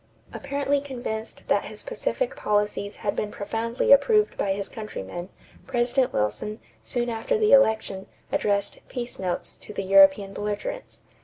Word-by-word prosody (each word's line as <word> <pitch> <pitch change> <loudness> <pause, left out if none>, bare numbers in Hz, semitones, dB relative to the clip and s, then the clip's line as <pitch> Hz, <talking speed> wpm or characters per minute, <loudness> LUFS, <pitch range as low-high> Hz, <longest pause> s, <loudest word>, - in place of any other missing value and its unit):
= 110 - -27
Apparently 280 0 -1
convinced 240 -5 -5
that - - +2
his - - -8
pacific - - -2
policies 210 -1 0
had 200 - +1
been 210 - -2
profoundly 225 +4 -1
approved 420 +10 +5
by 195 - 0
his 200 0 -3
countrymen, 175 - -7 0.4
President 250 0 +1
Wilson, 105 - -1 0.2
soon 240 -1 -1
after 235 - 0
the 430 -1 +3
election, 220 -7 +3 0.2
addressed 200 -1 0
"peace 245 -1 -4
notes" 180 -2 -3
to - - -10
the 195 - -2
European 195 +1 +6
belligerents. 210 - -5
220 Hz, 145 wpm, -25 LUFS, 200-270 Hz, 0.4 s, European